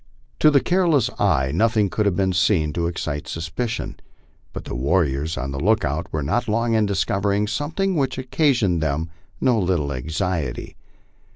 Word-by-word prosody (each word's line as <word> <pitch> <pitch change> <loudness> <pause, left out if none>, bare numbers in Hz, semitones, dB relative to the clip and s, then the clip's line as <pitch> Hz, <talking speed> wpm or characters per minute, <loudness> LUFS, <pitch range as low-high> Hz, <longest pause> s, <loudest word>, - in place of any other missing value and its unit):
To 155 - +6
the 140 -3 +4
careless 170 - +2
eye 65 0 +2
nothing 110 +2 +2
could 105 +2 0
have 95 - +1
been 95 0 +1
seen 85 -4 +2
to 85 -1 -1
excite 80 -4 -4
suspicion. 85 +9 -4 0.5
But - - -8
the - - -6
warriors 70 +2 0
on 70 +1 -3
the 70 - -4
lookout 85 -5 0
were 75 -2 -2
not 120 - 0
long 115 +2 +1
in 110 -2 +2
discovering 100 +1 0
something 155 - -1
which 135 -5 0
occa 135 +4 +1
sioned 95 -8 +1
them 80 +1 -2 0.3
no 120 -3 +2
little 85 -7 0
anxiety. 80 +1 -3
95 Hz, 165 wpm, -22 LUFS, 80-115 Hz, 0.5 s, To